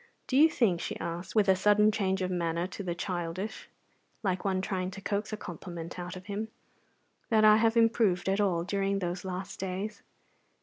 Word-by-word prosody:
"Do 255 - -2
you 310 +4 +7
think," 200 - +1
she - - -4
asked, 170 +5 -5
with 210 -2 +4
a 190 - +6
sudden 210 +2 +4
change 190 -3 0
of 185 - -1
manner 170 -1 -1
to 185 +2 -7
the 175 -3 -3
childish, 180 +3 -4 0.5
like 185 -3 0
one 190 -2 +1
trying 185 -1 -2
to 190 +1 -9
coax 205 +2 -2
a 215 - -3
compliment 170 -2 -7
out 180 +1 -5
of 185 0 -10
him, 205 +2 -3 0.8
"that 220 -1 +5
I 215 0 +8
have 225 +1 +3
improved 225 -6 +3
at 195 +2 +2
all 175 -4 +1
during 195 +1 0
those 180 -1 -3
last 185 0 -5
days? 195 +3 -4
190 Hz, 190 wpm, -30 LUFS, 180-210 Hz, 0.8 s, I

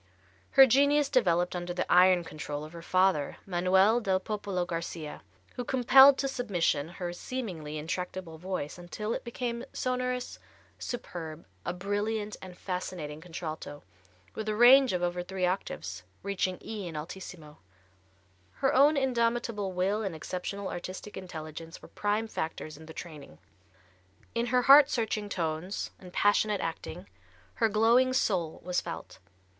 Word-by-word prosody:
Her 270 - +11
genius 285 +3 +4
developed 180 -10 +2
under 175 0 -4
the - - 0
iron 180 -1 +6
control 150 -2 -6
of 155 +2 -10
her 170 - -8
father, 185 -4 +2
Manuel 190 +5 +3
del 190 -3 +1
Popolo 200 -3 -3
Garcia, 165 -3 -5 0.4
who 245 - -2
compelled 265 +2 +7
to 275 - 0
submission 185 - 0
her 175 -1 -5
seemingly 175 -9 -5
intractable 170 +1 -5
voice 180 -3 -4
until 210 +5 -4
it - - -4
became 235 0 -4
sonorous, 250 0 -2 0.4
superb, 165 -9 -6 0.2
a - - +1
brilliant 205 +3 -2
and 185 -1 -10
fascinating 175 -5 -5
contralto, 160 -4 -7 0.5
with 220 0 -4
a 215 - 0
range 255 +3 +7
of 180 -1 -1
over 175 0 -1
three 185 +1 -2
octaves, 95 - -3 0.2
reaching 190 -2 -1
E 210 -4 -5
in 165 - -7
alt. 150 +4 -5 1.4
Her 270 - +1
own 285 +3 +5
indomitable 235 -5 0
will 190 +4 0
and 195 -6 -3
exceptional 185 +5 -4
artistic 185 +4 -6
intelligence 165 -2 -8
were - - -13
prime 210 +2 -1
factors 160 -5 -4
in 160 +1 -13
the - - -9
training. 150 - -9 1.0
In 235 +1 0
her 250 +1 +2
heart 280 +2 +9
searching 220 -4 -1
tones 170 +1 -3
and 180 -1 -12
passionate 205 +1 +2
acting 165 +2 -5 0.6
her 225 - +5
glowing 235 +5 +4
soul 180 -10 0
was 180 0 0
felt. 170 - -8
185 Hz, 140 wpm, -29 LUFS, 170-230 Hz, 1.4 s, Her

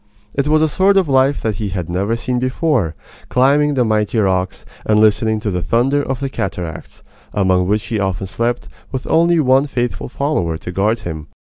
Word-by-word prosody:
It 140 +1 0
was 155 +1 +3
a - - +4
sort 195 +6 +3
of 190 -4 +3
life 135 0 +2
that 110 -4 -1
he 105 -1 -3
had 90 -3 -4
never 95 +6 -1
seen 125 +2 -2
before, 130 - 0 0.3
climbing 145 +3 +3
the 125 -2 +2
mighty 110 +1 0
rocks, 95 -3 0 0.2
and 105 0 +2
listening 110 0 +3
to 105 -2 -2
the 90 -1 -2
thunder 130 +8 +1
of 135 -1 -4
the 135 - -1
cataracts, 90 - -5 0.3
among 95 -3 +2
which 105 +2 0
he 110 -2 -2
often 95 -1 -2
slept, 115 +5 -2 0.2
with 130 -1 -4
only 170 +1 +3
one 135 0 +3
faithful 125 -2 -3
follower 105 - -1
to 90 - -7
guard 105 +5 0
him. 80 -3 -6
115 Hz, 190 wpm, -18 LUFS, 95-135 Hz, 0.3 s, a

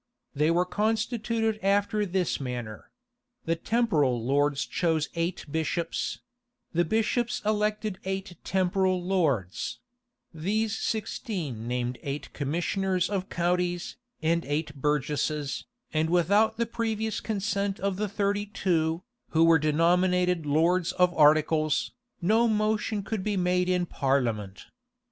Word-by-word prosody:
They 150 +3 +2
were 175 +2 +3
constituted 220 +2 0
after 205 +1 +2
this 180 -1 0
manner: 120 -5 -6 0.6
The 165 - +1
temporal 165 - +1
lords 140 +1 +2
chose 160 -3 0
eight 170 +1 -2
bishops: 160 +2 -2 0.5
the 170 +1 +3
bishops 225 +6 0
elected 210 -2 0
eight 190 -1 -4
temporal 185 0 +1
lords: 150 - 0 0.6
these 210 +7 -1
sixteen 180 - -3
named 125 0 -2
eight 140 +1 -5
commissioners 180 +6 -1
of 195 -2 -2
counties, 175 0 -1 0.3
and 170 +1 +2
eight 145 +1 -2
burgesses, 150 0 -1 0.3
and 155 +1 +1
without 200 +6 +3
the 235 - +1
previous 220 -1 -2
consent 200 -2 -2
of 195 -1 -1
the 210 0 -1
thirty 205 0 0
two, 165 -4 0 0.3
who 160 0 +3
were 165 -1 +6
denominated 175 +2 +2
lords 165 +4 +2
of 180 -1 +3
articles, 155 0 +3 0.3
no 220 +6 +4
motion 215 -1 0
could 215 -1 -3
be 205 -1 -1
made 180 0 +1
in 180 -1 +2
parliament. 120 - -1
180 Hz, 120 wpm, -27 LUFS, 155-205 Hz, 0.6 s, were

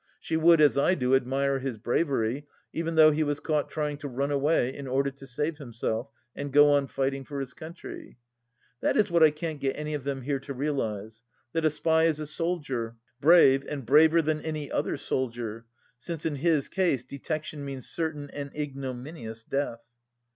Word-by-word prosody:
She 160 - -3
would, 165 +1 +6
as 145 -2 +5
I 180 +6 +3
do, 125 -5 +1
admire 135 +1 +2
his 130 -3 -4
bravery, 130 +2 0 0.3
even 165 0 -2
though 155 -1 +8
he 155 +1 0
was 145 -1 0
caught 150 -2 -1
trying 150 -1 -2
to 145 - -6
run 140 +2 -2
away 140 -2 +2
in 140 -1 -7
order 135 +2 +1
to 135 0 -13
save 145 +4 -2
himself 120 -1 -3 0.3
and 140 0 -5
go 145 +1 +7
on 140 -1 +3
fighting 135 0 -2
for 140 +1 -6
his 135 -2 -5
country. 165 -4 -10 0.6
That - - +1
is 205 -3 +3
what 170 -1 +3
I 160 - +9
can't 155 0 -5
get 135 -1 -1
any 150 0 -4
of 145 -3 -3
them 135 -2 -3
here 140 +1 -1
to 140 +1 -7
realize, 115 -6 -3 0.3
that 165 -1 0
a - - +6
spy 160 +2 +2
is 160 -2 +1
a 155 - -3
soldier, 145 -8 -1 0.2
brave, 140 -3 +6
and 140 -4 -5
braver 160 +6 +6
than 155 0 0
any 155 -2 -4
other - - -1
soldier, 115 -3 -3 0.3
since 165 +3 -5
in 155 -3 -1
his 155 -1 +2
case 175 -10 +1
detection 145 +3 -5
means 135 -2 -6
certain 150 -3 -3
and 140 -1 -5
ignominious 130 -4 -6
death. 135 -3 -2
145 Hz, 190 wpm, -28 LUFS, 130-155 Hz, 0.6 s, I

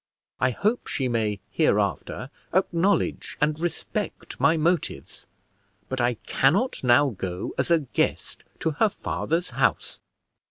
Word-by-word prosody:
I 130 -1 +3
hope 210 - 0
she 130 - -1
may 110 -4 -1
hereafter 105 - 0 0.2
acknowledge 190 +1 +1
and 150 +1 +1
respect 175 0 -4
my 165 0 +4
motives, 170 +3 -1 0.6
but 130 -1 -1
I 120 0 +2
cannot 185 - +2
now 130 +3 +5
go 95 -3 -4
as - - +1
a 170 -2 +4
guest 135 - -2 0.2
to 160 - +1
her 210 +9 +2
father's 170 -3 -2
house." - - 0
145 Hz, 125 wpm, -25 LUFS, 120-170 Hz, 0.6 s, now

